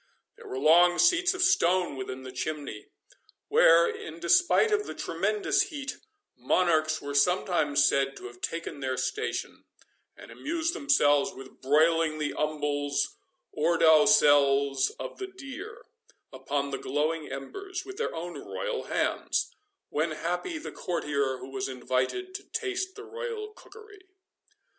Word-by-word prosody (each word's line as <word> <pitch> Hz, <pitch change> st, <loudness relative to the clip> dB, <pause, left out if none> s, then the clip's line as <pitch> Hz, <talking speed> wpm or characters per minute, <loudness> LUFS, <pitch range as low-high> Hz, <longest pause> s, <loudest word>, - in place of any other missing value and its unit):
There -, -, -14 dB
were 130 Hz, -, -5 dB
long 175 Hz, +5 st, +5 dB
seats 355 Hz, +1 st, +3 dB
of 365 Hz, -, +1 dB
stone 185 Hz, -, +2 dB
within 130 Hz, 0 st, -6 dB
the 130 Hz, -, -8 dB
chimney, 140 Hz, -4 st, -5 dB, 0.6 s
where, 165 Hz, +1 st, +6 dB
in 160 Hz, +1 st, -6 dB
despite 355 Hz, -, +4 dB
of 420 Hz, 0 st, +1 dB
the -, -, -6 dB
tremendous 395 Hz, -2 st, 0 dB
heat, 280 Hz, -5 st, -6 dB, 0.4 s
monarchs 155 Hz, +4 st, +1 dB
were 145 Hz, 0 st, -5 dB
sometimes 150 Hz, -2 st, +2 dB
said 135 Hz, 0 st, 0 dB
to -, -, -10 dB
have 120 Hz, 0 st, -11 dB
taken 165 Hz, -3 st, -4 dB
their 130 Hz, -1 st, -2 dB
station, 430 Hz, -, -3 dB, 0.5 s
and -, -, -12 dB
amused 330 Hz, +1 st, -2 dB
themselves 145 Hz, -, +3 dB
with 130 Hz, 0 st, -13 dB
broiling 155 Hz, +3 st, +3 dB
the 150 Hz, -1 st, -2 dB
umbles, 145 Hz, -2 st, -1 dB, 0.4 s
or 165 Hz, +3 st, +1 dB
dowsels, 145 Hz, -6 st, +5 dB
of -, -, -7 dB
the 385 Hz, -, -4 dB
deer, 385 Hz, -, -10 dB, 0.5 s
upon 140 Hz, 0 st, -3 dB
the 135 Hz, -, -3 dB
glowing 150 Hz, +3 st, -2 dB
embers, 370 Hz, -, -6 dB
with 390 Hz, 0 st, -9 dB
their 460 Hz, -, -2 dB
own 175 Hz, +2 st, -6 dB
royal -, -, -4 dB
hands, -, -, -1 dB, 0.4 s
when 155 Hz, +3 st, 0 dB
happy 180 Hz, -, -3 dB
the 315 Hz, -, -7 dB
courtier 140 Hz, -6 st, -2 dB
who 130 Hz, +1 st, -10 dB
was 135 Hz, 0 st, -3 dB
invited 130 Hz, -, -2 dB
to 400 Hz, +1 st, -6 dB
taste 380 Hz, -1 st, -3 dB
the 420 Hz, -, -9 dB
royal 440 Hz, -1 st, -6 dB
cookery. 420 Hz, -2 st, -15 dB
165 Hz, 140 wpm, -28 LUFS, -, 0.6 s, where